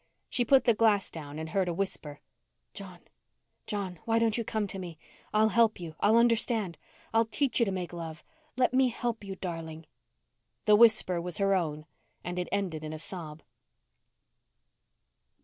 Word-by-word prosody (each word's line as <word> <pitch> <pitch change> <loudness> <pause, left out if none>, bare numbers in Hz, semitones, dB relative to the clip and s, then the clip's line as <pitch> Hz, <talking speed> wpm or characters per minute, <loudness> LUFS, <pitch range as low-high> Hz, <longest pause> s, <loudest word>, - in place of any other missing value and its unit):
She 245 - +1
put 265 +3 +5
the 235 - +4
glass 210 -3 +2
down 150 -2 -8
and 160 0 -5
heard 190 +2 0
a 170 - -2
whisper: 165 -6 -4 0.5
"John, 190 -4 -10 0.7
John, 190 -5 -4
why 225 0 +2
don't 230 -2 +2
you 235 - 0
come 220 -1 -1
to 195 -1 -6
me? 175 -3 -7 0.3
I'll 215 +1 +4
help 225 0 +3
you. 165 -3 -7
I'll 220 +2 +4
understand. 230 -5 +2 0.3
I'll 225 +1 +4
teach 270 +3 0
you 235 - +3
to - - 0
make 180 -2 -4
love. 160 -2 -7 0.3
Let 255 -1 +2
me 260 0 +4
help 240 -2 -3
you, 195 -1 -6
darling." 165 -3 -6 0.8
The 210 - +6
whisper 215 -6 +5
was 175 -1 -4
her 195 0 +2
own 155 -5 -1 0.4
and 175 +1 -4
it 180 - -3
ended 175 -6 -2
in 155 0 -5
a - - -5
sob. 160 -2 -8
195 Hz, 170 wpm, -29 LUFS, 170-225 Hz, 0.8 s, The